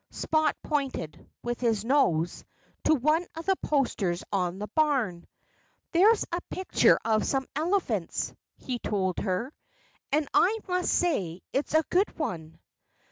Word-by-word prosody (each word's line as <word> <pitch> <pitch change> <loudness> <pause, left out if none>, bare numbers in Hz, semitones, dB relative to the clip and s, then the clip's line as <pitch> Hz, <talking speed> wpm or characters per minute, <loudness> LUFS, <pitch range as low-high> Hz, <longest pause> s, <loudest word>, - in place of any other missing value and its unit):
Spot 315 -2 +1
pointed 275 - -3
with 240 0 -3
his 225 -3 +1
nose 175 - +2 0.4
to 315 - +5
one 305 +5 +2
of 325 0 -6
the 385 - +3
posters 205 - 0
on 180 -2 0
the 205 - -4
barn. 260 - 0 0.6
"There's 415 +6 +5
a 345 +1 -1
picture 375 0 +3
of 220 -1 +2
some 270 -1 0
elephants," 305 - -1 0.2
he 250 -2 -4
told 190 -5 -1
her. 220 +8 -2 0.6
"And 295 +1 +2
I 415 +5 +4
must 360 0 0
say 190 - 0
it's 285 +3 -1
a 315 - +5
good 385 +3 +2
one." 165 - -4
270 Hz, 135 wpm, -28 LUFS, 190-315 Hz, 0.6 s, to